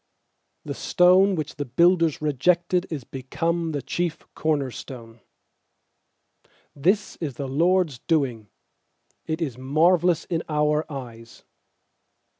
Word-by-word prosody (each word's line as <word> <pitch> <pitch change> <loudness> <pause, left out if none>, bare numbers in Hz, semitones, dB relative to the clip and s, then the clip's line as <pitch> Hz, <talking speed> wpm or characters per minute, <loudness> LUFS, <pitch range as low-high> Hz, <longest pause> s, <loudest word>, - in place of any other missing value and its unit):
stone 185 +2 +4
which 155 -3 -5
the 145 - -2
builders 165 +3 +2
re 150 -1 +1
jected 175 +6 +1
Is 145 -5 -4
become 165 +7 -2
the 145 -3 -4
chief 175 -2 -3
corner 145 -4 -1
stone. 115 -1 -10 1.6
is 200 +5 +1
the 140 -4 -4
LORD'S 165 0 +1
doing; 130 -10 0 0.8
It 160 +1 -1
is 130 -5 -5
marvellous 165 +5 +2
in 165 -2 -2
our 150 +1 0
eyes. 115 -4 -9
155 Hz, 105 wpm, -24 LUFS, 135-175 Hz, 1.6 s, stone